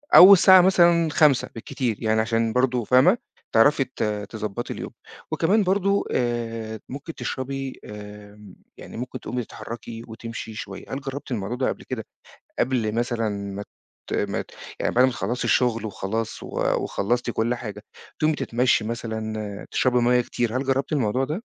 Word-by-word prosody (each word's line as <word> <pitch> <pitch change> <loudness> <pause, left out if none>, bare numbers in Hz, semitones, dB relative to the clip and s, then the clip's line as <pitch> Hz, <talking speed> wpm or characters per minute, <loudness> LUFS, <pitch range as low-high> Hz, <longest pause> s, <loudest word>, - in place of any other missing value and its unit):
أو 190 +3 +12
الساعة 190 -1 +8
مثلًا 170 -3 +4
17:00 145 -5 +4
بالكتير 115 0 -2
يعني 110 0 +2
علشان 115 0 +1
برضه 125 -1 +1
فاهمة، 130 - +5 0.3
تعرفي 135 +5 +5
ت 130 - -5 0.3
تضبطي 110 +1 -4
اليوم، - - -7 0.4
وكمان 205 +6 +2
برضه، 200 +1 +2
آآ، 115 -3 -2
ممكن 145 +5 -7
تشربي، 135 0 -4
آمم، 105 -1 -11 0.2
يعني - - -10
ممكن 125 +1 -5
تقومي 125 0 -3
تتحركي 115 0 -8
وتمشي 115 -1 -7
شوية. 100 -3 -7
هل 140 - -3
جربتِ 135 0 -6
الموضوع 110 +1 -2
ده 130 - 0
قبل - - -5
كده، 120 -4 -5 0.5
قبل 120 -4 0
مثلًا 115 -1 0
ما 100 0 -5 0.5
ت - - -2
ما - - -1
ت - - -21 0.3
يعني - - 0
بعد 125 +1 +5
ما 130 - +4
تخلصي 120 +1 -3
الشغل 115 -3 +2
وخلاص 110 +2 -4
و - - -7 0.4
وخلصتِ 120 +4 -1
كل 115 +2 0
حاجة، 105 -4 -7 0.4
تقومي 155 0 +2
تتمشي 120 -2 +1
مثلًا، 110 -2 -4
تشربي 125 -1 +2
مَيَّة 125 +1 +4
كتير، 120 0 -2
هل 135 - -1
جربتِ 135 +3 0
الموضوع 130 -1 +1
ده؟ 165 - -4
120 Hz, 160 wpm, -24 LUFS, 110-135 Hz, 0.5 s, أو